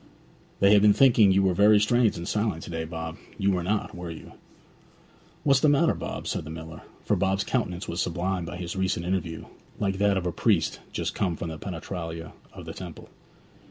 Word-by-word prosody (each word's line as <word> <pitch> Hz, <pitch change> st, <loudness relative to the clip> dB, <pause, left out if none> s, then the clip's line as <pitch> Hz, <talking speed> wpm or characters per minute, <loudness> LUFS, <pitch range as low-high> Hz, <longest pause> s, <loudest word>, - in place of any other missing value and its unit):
'They 100 Hz, +1 st, +6 dB
have 105 Hz, -, +6 dB
been 105 Hz, 0 st, +6 dB
thinking 115 Hz, -6 st, +6 dB
you 95 Hz, +1 st, +4 dB
were 95 Hz, -1 st, +3 dB
very 105 Hz, +3 st, +6 dB
strange 115 Hz, +1 st, +2 dB
and 85 Hz, +1 st, -6 dB
silent 105 Hz, -6 st, -1 dB
to -, -, -8 dB
day, 80 Hz, -1 st, -3 dB
Bob; 80 Hz, 0 st, -6 dB, 0.2 s
you 100 Hz, 0 st, +2 dB
were 90 Hz, -2 st, 0 dB
not, 105 Hz, +4 st, -1 dB
were 90 Hz, -1 st, -6 dB
you?' 80 Hz, -, -9 dB, 1.1 s
'What's 140 Hz, -2 st, +4 dB
the 150 Hz, -, +4 dB
matter, 150 Hz, +4 st, +4 dB
Bob?' -, -, -6 dB
said -, -, -2 dB
the 75 Hz, -, -9 dB
miller; 80 Hz, 0 st, -8 dB, 0.2 s
for -, -, +2 dB
Bob's 95 Hz, +1 st, +1 dB
countenance 100 Hz, -6 st, -2 dB
was 85 Hz, -, -2 dB
sublimed 90 Hz, 0 st, -2 dB
by 85 Hz, -, -6 dB
his 90 Hz, -1 st, -5 dB
recent 95 Hz, -2 st, -1 dB
interview, 90 Hz, -3 st, -2 dB, 0.3 s
like 95 Hz, -2 st, -1 dB
that 100 Hz, -1 st, +3 dB
of 90 Hz, -, -2 dB
a 90 Hz, -, 0 dB
priest 85 Hz, -, +1 dB
just -, -, -2 dB
come 90 Hz, -5 st, -1 dB
from 85 Hz, -, -5 dB
the 80 Hz, -1 st, -7 dB
penetralia 85 Hz, -2 st, -6 dB, 0.2 s
of -, -, -10 dB
the -, -, -6 dB
temple. -, -, -9 dB
95 Hz, 205 wpm, -26 LUFS, 85-105 Hz, 1.1 s, They